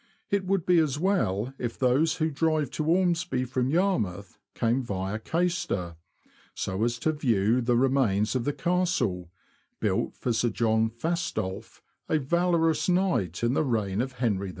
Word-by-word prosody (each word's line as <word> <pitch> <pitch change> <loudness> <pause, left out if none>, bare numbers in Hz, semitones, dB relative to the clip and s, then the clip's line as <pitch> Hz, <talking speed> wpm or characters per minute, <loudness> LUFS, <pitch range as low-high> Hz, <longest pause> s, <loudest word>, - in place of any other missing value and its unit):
It 200 -1 +1
would 195 -3 +1
be 180 -2 +4
as 150 -4 +1
well 135 - 0
if 120 -2 -4
those 135 +5 +2
who 160 -1 0
drive 155 -1 0
to 155 - -3
Ormsby 175 -5 +1
from 125 +1 -1
Yarmouth 110 - -1 0.2
came 120 +3 +1
via 100 -2 -3
Caister, 165 - -1 0.6
so 95 +3 -2
as 120 0 0
to 155 - 0
view 120 -5 +1
the 120 0 +1
remains 120 -6 +2
of 125 - 0
the 145 - 0
Castle, 165 - 0 0.5
built - - -1
for 120 - -2
Sir 120 +2 +1
John 110 -1 +1
Fastolfe, 155 - -4 0.3
a 155 - +3
valorous 165 +3 +1
knight 135 - +1
in 120 +1 +2
the 150 - +2
reign 110 -6 0
of 130 +1 -4
Henry 110 -6 -1
V. - - -5
130 Hz, 160 wpm, -27 LUFS, 110-165 Hz, 0.6 s, be